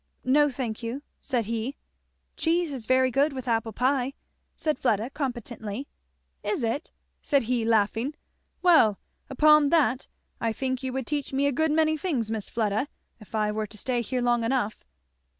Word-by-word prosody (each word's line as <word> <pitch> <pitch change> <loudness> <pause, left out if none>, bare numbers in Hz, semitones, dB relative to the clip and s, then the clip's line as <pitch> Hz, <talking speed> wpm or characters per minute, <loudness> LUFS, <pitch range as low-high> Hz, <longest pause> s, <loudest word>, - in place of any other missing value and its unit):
"No, 290 +3 +4
thank 245 -5 -4
you," 240 +5 -4 0.2
said 245 -5 -1
he. 230 +5 -3 0.6
"Cheese 335 -2 +1
is 240 -5 -6
very 260 0 +4
good 280 +3 +2
with 260 -2 -6
apple 225 -1 0
pie," 255 +3 +1 0.4
said 305 -4 -1
Fleda 225 0 +1
competently. 240 -3 -4 0.5
"Is 360 - -1
it?" 230 +8 -2 0.3
said 280 -4 +2
he 240 0 0
laughing. 225 +5 +1 0.5
"Well 310 - +6 0.3
upon 300 +1 +5
that 270 -6 +2 0.3
I 230 -1 0
think 260 +1 -2
you 260 -1 -3
would 265 -1 -3
teach 290 0 -3
me 275 +1 +2
a 285 - +3
good 315 +4 +1
many 315 0 +3
things, 270 - -1
Miss 220 -2 -3
Fleda, 220 +3 0 0.3
if 215 0 -10
I 210 -1 +1
were 215 0 -2
to 210 - -11
stay 245 +3 0
here 250 +2 -2
long 240 -1 +2
enough." 230 -3 -1
255 Hz, 170 wpm, -27 LUFS, 225-285 Hz, 0.6 s, Well